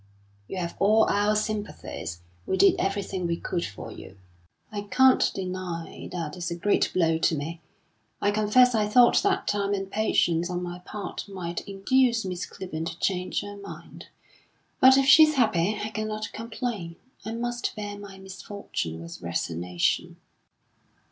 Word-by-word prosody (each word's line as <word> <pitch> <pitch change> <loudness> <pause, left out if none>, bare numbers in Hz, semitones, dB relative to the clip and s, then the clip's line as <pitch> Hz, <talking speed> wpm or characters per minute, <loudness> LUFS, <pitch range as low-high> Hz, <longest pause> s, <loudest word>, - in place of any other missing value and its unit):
"You - - -6
have 170 -2 -3
all 215 +3 +5
our 205 +1 +2
sympathies. 210 - -4 0.3
We 190 - 0
did 195 +2 +6
everything 195 -2 -1
we 170 0 -1
could 175 0 -2
for 100 - -7
you." 95 - -11 0.5
"I 205 -1 -3
can't 260 0 +5
deny 185 -3 -5
that 165 -4 -4
it's 175 -1 -4
a 170 - -3
great 200 +4 +2
blow 165 -3 +2
to 165 - +2
me. 160 +3 -5 0.6
I 205 - +2
confess 215 +4 +4
I 215 -2 +2
thought 240 +3 +6
that 390 -1 0
time 200 0 +1
and 195 0 -5
patience 175 -5 +1
on 180 0 -3
my 175 0 -5
part 205 +2 -7
might 175 -3 -4
induce 235 +3 +2
Miss 180 -1 -4
Clibborn 165 -4 -6
to 165 - -6
change 180 0 -1
her 205 0 -8
mind. 200 - -10 0.7
But 260 +1 +8
if 275 - +4
she's 305 +2 +7
happy, 215 -6 +2
I 215 - -3
cannot 215 0 -4
complain. 225 -6 -4 0.3
I 220 +2 -5
must 240 +1 -3
bear 205 -2 -5
my 200 -1 -10
misfortune 190 - -6
with 85 0 -9
resignation." 85 0 -1
195 Hz, 155 wpm, -26 LUFS, 170-215 Hz, 0.7 s, But